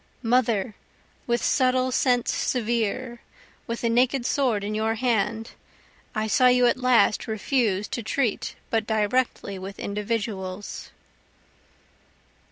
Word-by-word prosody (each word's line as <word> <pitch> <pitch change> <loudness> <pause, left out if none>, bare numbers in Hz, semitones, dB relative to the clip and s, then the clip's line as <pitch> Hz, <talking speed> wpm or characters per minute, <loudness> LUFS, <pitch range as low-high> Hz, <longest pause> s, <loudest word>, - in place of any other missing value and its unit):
(Mother! 230 -3 +1 0.5
with 235 0 0
subtle 255 -1 +2
sense 245 -1 +2
severe, 235 0 -1 0.5
with 230 0 -4
the 235 - +1
naked 250 +2 +2
sword 245 -7 +1
in 210 +1 -3
your 220 +1 0
hand, 225 -1 -1 0.6
I 215 -1 0
saw 250 +4 +4
you 250 0 +5
at 240 - +3
last 250 -4 +3
refuse 220 -2 0
to 235 - -3
treat 230 0 -1 0.2
but 225 -1 0
directly 215 -2 0
with 195 +1 -8
individuals.) 205 -2 -4
230 Hz, 115 wpm, -25 LUFS, 210-250 Hz, 0.6 s, you